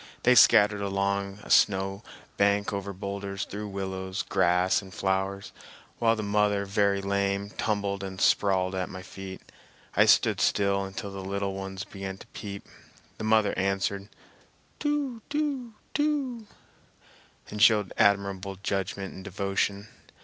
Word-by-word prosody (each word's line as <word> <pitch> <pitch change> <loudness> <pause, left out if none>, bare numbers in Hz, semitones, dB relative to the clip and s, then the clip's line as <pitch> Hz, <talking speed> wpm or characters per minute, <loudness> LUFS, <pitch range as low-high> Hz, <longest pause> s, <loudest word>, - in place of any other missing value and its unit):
They 125 - +6
scattered 105 -4 +6
along 100 0 -1
a - - -8
snow 95 0 +3 0.3
bank, 100 +1 +2
over 100 0 -3
boulders, 100 0 -4
through 105 +1 -6
willows, 95 -1 -4
grass, 90 0 +2
and 95 -1 -12
flowers, 95 +2 -2 0.5
while 115 -1 +3
the 110 - -4
mother, 105 -1 +1
very 100 0 +1
lame, 100 0 -1
tumbled 100 -3 -2
and 95 -1 -6
sprawled 95 -1 +2
at 95 -1 -2
my 95 0 -8
feet. 95 -1 -9 0.5
I - - +6
stood - - +4
still 100 -1 +2
until 100 +1 -6
the 95 -1 -7
little 100 0 -2
ones 95 0 -5
began 95 -1 -7
to - - -13
peep; 100 -2 -7 0.5
the - - -4
mother 110 -1 +3
answered 100 +1 -1 0.7
"Too 290 -6 -1
too 285 -6 -2 0.2
too" 275 -7 -1 1.0
and 105 - -4
showed 105 -4 +5
admirable 100 -1 +1
judgment 95 -1 -2
and 95 - -10
devotion. 100 +1 -2
100 Hz, 135 wpm, -27 LUFS, 95-105 Hz, 1.0 s, They